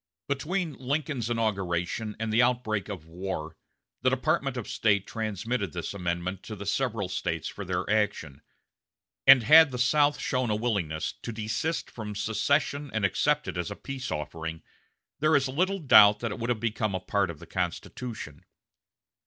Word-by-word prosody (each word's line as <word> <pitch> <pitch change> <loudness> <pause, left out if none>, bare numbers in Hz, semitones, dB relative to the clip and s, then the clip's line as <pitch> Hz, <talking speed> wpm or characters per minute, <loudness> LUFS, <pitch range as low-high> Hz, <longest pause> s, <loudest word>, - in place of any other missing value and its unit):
Between 160 +4 -1
Lincoln's 135 -2 -2
inauguration 105 -2 -1
and 110 -1 -2
the 115 - +5
outbreak 120 -5 0
of 90 -6 -6
war, 80 -2 -5 0.5
the - - +4
Department - - 0
of - - -4
State 100 -3 +1
transmitted 110 -2 -3
this 85 +1 -4
amendment 90 0 -3
to 110 - -7
the 100 0 -8
several 110 -1 -1
States 80 -3 -3
for 100 - -6
their 90 -1 -2
action; 100 -9 -1 0.9
and 135 -3 +9
had 160 +6 +8
the 125 - -5
South 145 +4 +3
shown 130 -3 -1
a 105 - +1
willingness 100 -9 -1
to 120 - -5
desist 115 +9 -2
from 105 -3 -6
secession 140 +7 0
and 110 -2 +2
accept 95 - +1
it - - -4
as 85 - -2
a - - -5
peace 135 -2 -6
offering, 80 +2 -5 0.6
there 155 +2 +3
is 135 -1 +3
little 185 +9 0
doubt 105 - +7
that 115 -2 -2
it - - -6
would 115 +1 -3
have 120 -3 0
become 110 -3 -1
a - - -1
part 100 +1 0
of 85 - -6
the - - -12
Constitution. 90 - -5
110 Hz, 170 wpm, -28 LUFS, 95-125 Hz, 0.9 s, and